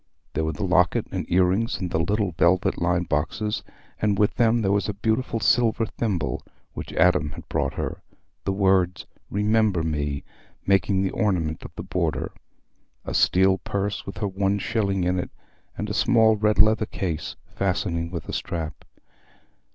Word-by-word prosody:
There 80 - 0
were 80 - 0
the 105 - -5
locket 90 -1 +3
and - - -3
ear 90 +1 +5
rings 100 +7 0
in 90 - -3
the 80 - 0
little 100 +2 0
velvet 85 +3 +2
lined 90 0 +1
boxes, 85 +9 -1 0.4
and 105 -2 +2
with 105 0 +3
them 115 -1 +2
there 95 - +2
was 100 +1 +1
a 100 - -3
beautiful 110 +3 0
silver 115 0 +3
thimble 90 - -2 0.3
which - - -7
Adam 80 -3 +3
had - - -10
bought - - -1
her, - - -4 0.4
the 95 - 0
words 95 -3 +2 0.2
"Remember 105 -3 +2
me" 75 -3 -2 0.4
making 95 0 +2
the 95 - 0
ornament 85 -8 0
of - - -8
the - - -6
border; - - -1 0.7
a - - -4
steel 95 +1 +4
purse, 100 0 -3
with 95 - -6
her 105 - -1
one 100 +1 0
shilling 100 -2 0
in 90 +1 +1
it; - - -4 0.5
and 105 - -3
a 105 - -3
small 110 0 +4
red 105 0 +1
leather 110 +1 +4
case, 85 -5 -3 0.2
fastening 85 -3 -1
with 85 -2 -6
a - - -5
strap. 80 -4 -4
95 Hz, 170 wpm, -24 LUFS, 90-105 Hz, 0.7 s, ear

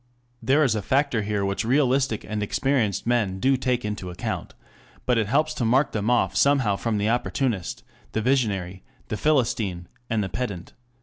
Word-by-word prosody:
] 120 0 -41
There 145 +3 +5
is 130 - +3
a 110 - -1
factor 135 -1 +1
here 105 -1 -1
which 100 0 -1
realistic 130 -1 +1
and 105 -1 -3
experienced 110 -2 0
men 110 -6 0
do 135 +5 +3
take 125 -2 -1
into 105 -3 -4
account, 90 - -5 0.5
and 125 -2 +3
it 110 - 0
helps 155 +6 +1
to 140 - -3
mark 130 +5 +3
them 105 +1 -1
off 95 -6 +2
somehow 135 -5 +3
from 110 +1 -1
the 105 +1 0
opportunist, 120 -4 -1 0.3
the 110 - 0
visionary, 100 -8 0 0.3
the - - -1
philistine 110 - 0 0.2
and 110 -2 +1
the 95 - -4
pedant. 95 -3 -5
115 Hz, 180 wpm, -24 LUFS, 100-130 Hz, 0.5 s, There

